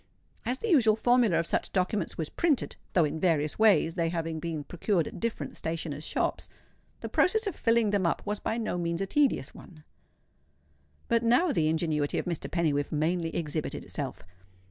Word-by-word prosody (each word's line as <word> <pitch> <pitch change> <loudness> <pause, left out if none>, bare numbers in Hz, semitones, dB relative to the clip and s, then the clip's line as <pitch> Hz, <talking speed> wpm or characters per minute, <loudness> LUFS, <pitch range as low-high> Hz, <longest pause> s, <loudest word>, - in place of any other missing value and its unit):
As 250 +2 0
the 460 - -4
usual 235 - +5
formula 240 -5 +3
of 165 - +1
such - - -1
documents 190 +2 -1
was 160 -3 -2
printed 310 - 0 0.2
(though 175 - +4
in 155 +1 -3
various 155 -3 +1
ways, 210 -7 +4
they 165 -2 0
having 165 -1 -3
been 160 -2 -4
procured 175 +2 0
at - - -8
different 230 0 -3
stationers' 160 -2 -4
shops) - - -2 0.5
the - - -4
process 440 +5 +2
of 400 - -2
filling 230 -2 +2
them 200 -4 +2
up - - -1
was 205 0 -2
by 225 - -2
no 215 -6 -2
means 170 0 -1
a - - +1
tedious 270 - +1
one. 155 -4 -14 1.2
But 230 -1 +2
now 250 +9 +3
the 160 - +1
ingenuity 155 -2 0
of - - -1
Mr. 170 -4 -3
Pennywhiffe 150 -5 0
mainly 165 +2 0
exhibited 155 -2 -3
itself. - - -5
175 Hz, 180 wpm, -28 LUFS, 160-225 Hz, 1.2 s, usual